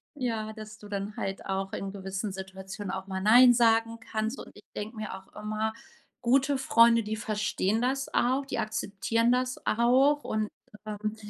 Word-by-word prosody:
ja 225 -5 -2
dass 215 -1 -10
du 210 - -11
dann 200 +1 -4
halt 195 0 -4
auch 195 0 -2
in 195 0 -4
gewissen 195 +1 -4
Situationen 190 +1 -7
auch 190 0 -5
mal 190 -1 -3
nein 245 +4 +8
sagen 230 -1 +3
kannst 220 +3 -3
und - - -9
ich 210 - -16
denke 215 +3 -5
mir 215 - -5
auch 190 0 -11
immer: 215 +1 -2 0.5
„Gute 270 +3 +3
Freunde, 230 -3 +5
die 215 +1 -3
verstehen 215 0 -1
das 270 +2 -1
auch, 260 +3 +2
die 255 - -3
akzeptieren 220 +2 0
das 255 0 0
auch.“ 260 +6 +3
Und, 215 -1 -1 0.4
ähm 215 0 -4
215 Hz, 170 wpm, -28 LUFS, 200-240 Hz, 0.5 s, nein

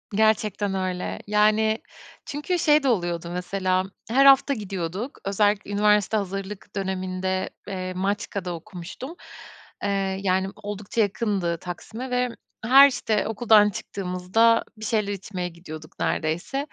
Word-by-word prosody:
Gerçekten 215 -2 +2
öyle. 185 -1 -2
Yani, 215 +1 +3 0.4
çünkü 300 +5 -2
şey 300 -2 +4
de 275 - +1
oluyordu 175 -6 -1
mesela 185 +1 0 0.3
her 270 +4 +4
hafta 275 +1 +7
gidiyorduk. 195 - -4
Özellikle 205 +1 +1
üniversite 210 0 +3
hazırlık 195 +1 -5
döneminde, 185 -1 -2 0.2
eee, 185 -2 -4
Maçka'da 195 -1 -2
okumuştum. 185 - -8 0.7
Eee, 195 -1 0
yani, 190 0 +1
oldukça 205 +2 -3
yakındı 200 -5 0
Taksim'e 220 +9 -7
ve 250 0 +1 0.4
her, 270 +4 +9
işte, 225 -5 -1
okuldan 215 -1 +5
çıktığımızda 195 +4 +1
bir 220 - -7
şeyler 210 -2 0
içmeye 185 -2 -5
gidiyorduk 155 -2 -11
neredeyse. 170 +12 -1
200 Hz, 120 wpm, -25 LUFS, 185-220 Hz, 0.7 s, her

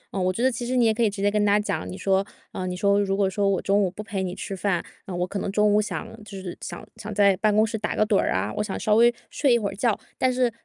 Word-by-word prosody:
嗯， 190 - 0
我 185 - +2
觉 225 +6 -3
得 260 - +4
其 240 0 -4
实 255 - -1
你 245 -2 +4
也 220 - +4
可 220 - -3
以 225 - +4
直 200 -1 -5
接 205 - +3
跟 210 0 +1
他 205 0 +4
讲， 95 - -3
你 90 - -7
说 195 - +2 0.3
呃， 185 - -4
你 180 - -3
说： 200 +2 +3
“如 195 -1 0
果 200 -1 +3
说 195 +1 0
我 195 - +1
中 200 +1 +2
午 190 - +2
不 200 +4 -8
陪 205 -2 -3
你 185 -1 -3
吃 195 - -5
饭， 185 -2 0 0.2
呃， 185 - -6
我 175 0 0
可 195 +2 -4
能 195 - -3
中 210 +1 +3
午 210 - +4
想 215 +1 -4 0.2
就 200 -2 -9
是 185 -2 -6
想 - - -7
想 210 - -7
在 200 -1 +4
办 210 +1 +2
公 215 +1 +5
室 220 0 -4
打 215 - -2
个 215 - +3
盹 210 -2 +2
儿 - - +1
啊， - - -1
我 210 - +1
想 200 - -4
稍 215 - +1
微 235 +2 +6 0.2
睡 275 -4 +2
一 - - +4
会 210 -4 -2
儿 - - -9
觉。” 230 +3 +2 0.3
但 255 - +3
是 250 -1 +2
205 Hz, 350 characters per minute, -25 LUFS, 195-215 Hz, 0.3 s, 微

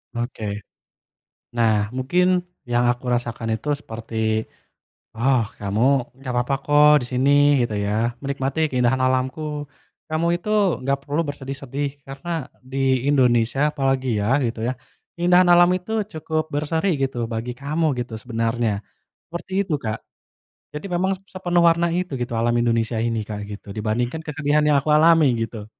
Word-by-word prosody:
Oke. 120 -1 -4 1.1
Nah, 115 -2 +3 0.2
mungkin 135 +8 +1 0.4
yang 120 0 +2
aku 120 +1 -4
rasakan 120 -1 -3
itu 110 - -6
seperti, 115 -2 -8 1.0
"Oh, 125 +1 +2 0.2
kamu 100 +2 -1 0.4
nggak 130 -2 -5
papa 125 +3 -1
kok 150 0 +6
di - - -4
sini, 130 +3 +2 0.3
gitu 120 -3 -1
ya, 100 - -1 0.3
menikmati 140 +1 -2
keindahan 125 +1 +2
alamku, 130 +3 0 0.7
kamu 155 +2 0
itu 210 - -6 0.3
nggak 135 +1 0
perlu 145 +2 -2
bersedih-sedih 140 0 -4 0.2
karena 135 +5 -8 0.4
di 135 - -4 0.3
Indonesia 120 -2 +3
apalagi 135 -2 0
ya 120 +7 +2
gitu 115 -1 -3
ya 130 - 0 0.4
keindahan 180 +1 +4
alam 175 0 +7
itu 185 +4 -6 0.2
cukup 155 0 -1
berseri, 155 +5 0 0.2
gitu, 135 -2 -2 0.2
bagi 115 +2 -3
kamu 150 +4 -1
gitu 120 -1 -5
sebenarnya", 115 -1 -1 0.6
seperti 170 +2 -7
itu, 160 - +1
Kak. 110 -1 -2 0.8
Jadi 150 - -8
memang 185 +2 +1
se 190 - -29
sepenuh 175 -2 +1
warna 170 +1 +2
itu, 180 -1 -2
gitu, 120 -1 -3
alam 120 +1 +2
Indonesia 115 -1 +1
ini, 115 -1 -1
Kak, 105 -1 -4
gitu, 105 0 -9
dibandingkan 120 +8 -1
kesedihan 150 0 +1
yang 150 -1 +4
aku 155 - -4
alami, 160 -1 +6
gitu. 115 -2 -5
135 Hz, 145 wpm, -22 LUFS, 120-155 Hz, 1.1 s, alam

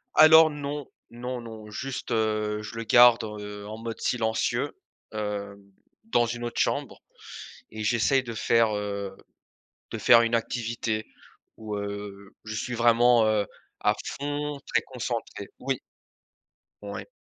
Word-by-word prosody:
Alors 160 0 +8
non, 145 0 -5 0.2
non, 125 +1 -5
non, 110 -2 -10
juste, 135 +4 -5
heu, 110 -1 0
je 105 +2 -8
le 115 - -3
garde, 120 +1 +7
heu, 105 -1 -7
en 110 +1 -7
mode 115 -1 -6
silencieux, 110 -2 -1 0.4
heu, 105 -1 -3 0.5
dans 120 - +2
une 120 +1 -4
autre 120 - -3
chambre - - -1 0.7
et 110 0 -6
j'essaye 120 +4 +2
de 115 -2 -6
faire 115 0 +3
heu, 100 -1 -4 0.8
de - - -3
faire 115 - +7
une 115 0 0
activité 115 -1 -1 0.5
où, 110 -1 -5
heu, 100 -1 -6
je 110 0 -5
suis 125 - -3
vraiment, 120 0 +5
heu, 105 -1 +2 0.4
à - - +3 0.3
fond, 145 0 -3
très - - +4
concentré. - - -5
Oui. - - -2 1.0
Ouais. - - -6
115 Hz, 135 wpm, -27 LUFS, 105-120 Hz, 1.0 s, Alors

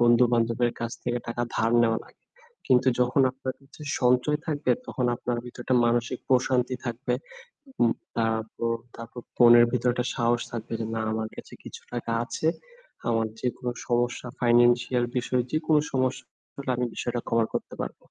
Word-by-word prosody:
বন্ধু-বান্ধবের 120 0 +3
কাছ 120 +1 -3
থেকে 120 0 -1
টাকা 120 +1 -2
ধার 115 +1 +2
নেওয়া 115 -1 +2
লাগে। - - -22 0.4
কিন্তু 130 0 +4
যখন 125 +2 +3
আপনার 130 0 -5
কাছে 140 +2 -15 0.2
সঞ্চয় 125 +4 +3
থাকবে 150 -2 0 0.2
তখন 125 - -1
আপনার 120 0 -2
ভিতরে 125 0 -9
একটা 130 - +2
মানসিক 120 +1 0
প্রশান্তি 130 -1 +2
থাকবে। 125 +2 -1 0.7
উম 115 -1 +5 0.2
তারপর, 115 +1 0 0.2
তারপর 115 +1 -9 0.2
মনের 120 -1 +8
ভিতরে 125 0 +2
একটা 125 0 -1
সাহস 120 0 +2
থাকবে 115 -1 -5
যে, 115 - -2
"না, 110 - -1
আমার 110 0 -2
কাছে - - -10
কিছু - - -9
টাকা 120 -1 -3
আছে। 155 - -2 0.6
আমার 115 -1 +1
যেকোনো 125 0 -2 0.2
সমস্যা 120 0 0
financial 120 +1 +4
বিষয় 125 +1 +1
যেকোনো 155 -1 +3
সমস্যা 130 -1 0 0.5
আমি 125 - +1
বিষয়টা 120 0 -2
কভার 115 -1 +2
করতে - - -4
পারবো।" - - -5
120 Hz, 155 wpm, -26 LUFS, 115-125 Hz, 0.7 s, মনের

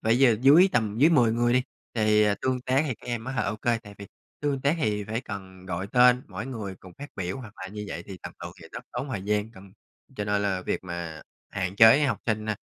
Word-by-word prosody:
phải 115 +3 +3
giờ 120 -5 +5
dưới 150 +9 +7
tầm 110 -2 0
dưới 155 +5 +6
10 120 -8 +4
người 120 +1 +2
đi, 125 0 +3 0.3
thì, 105 -1 +3
ờ, 105 -1 +3
tương 130 -1 0
tác 130 +4 +1
thì 130 - -2
các - - -17
em 120 -2 -3
á 130 - -4
ha, 135 - 0
ô 100 +2 -2
kê, 120 +1 0
tại 105 -2 -13
vì 100 - -9 0.3
tương 145 -2 -1
tác 140 +5 +1
hì 105 -7 -1
phải 110 +4 -3
cần 95 -3 -9
gọi 95 +1 -3
tên 125 +2 +5
mỗi 100 +5 -6
người 105 -7 -5
cùng 95 - -13
phát 145 +1 -8
biểu 95 -1 -3
hoặc 115 -5 -10
là 95 - -5
như 105 +1 -7
vậy 85 - -5
thì 95 -2 -9
tầm - - -7
từ - - -5
thì - - -11
rất - - -8
tốn 140 - -4
thời 105 -7 -4
gian. 105 +1 -1
Cần 95 -2 -15 0.4
cho 105 - -2
nên 105 0 0
là 95 -2 -1
việc - - -3
mà 85 -3 -6 0.3
hạn 95 -1 -3
chế 115 +7 +7
học 130 -7 0
sinh, 110 -2 -1
a, 105 - 0
110 Hz, 265 wpm, -26 LUFS, 100-125 Hz, 0.4 s, dưới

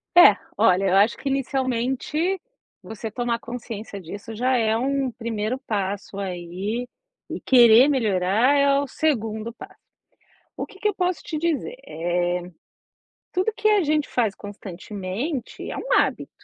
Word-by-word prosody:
É, 350 - +9 0.2
olha, 185 +2 +4
eu 190 - +3
acho 205 +3 +4
que 275 - -3
inicialmente 270 +6 -1 0.5
você 220 0 -6
tomar 235 0 -1
consciência 225 -4 -7
disso 200 +6 -8
já 255 +2 +2
é 220 -1 +2
um 270 +2 0
primeiro 225 0 -3
passo 200 -4 -3
aí, 190 +5 -3 0.4
e - - -4
querer 240 0 +7
melhorar 220 -1 +2
é 280 0 +4
o - - -2
segundo 230 -7 -1
passo. 385 +8 -12 0.8
O - - -4
que 410 -3 -16
que 425 - +1
eu 415 - +1
posso 360 -1 -1
te 310 - -4
dizer? 335 - -1
Eh, 175 +1 -1 0.9
tudo 375 +5 0
que 430 - +2
a 420 -2 +4
gente 300 0 +1
faz 220 -5 0
constantemente 205 - -5
é - - -5
um - - -2
hábito. - - +2
235 Hz, 145 wpm, -24 LUFS, 205-280 Hz, 0.9 s, É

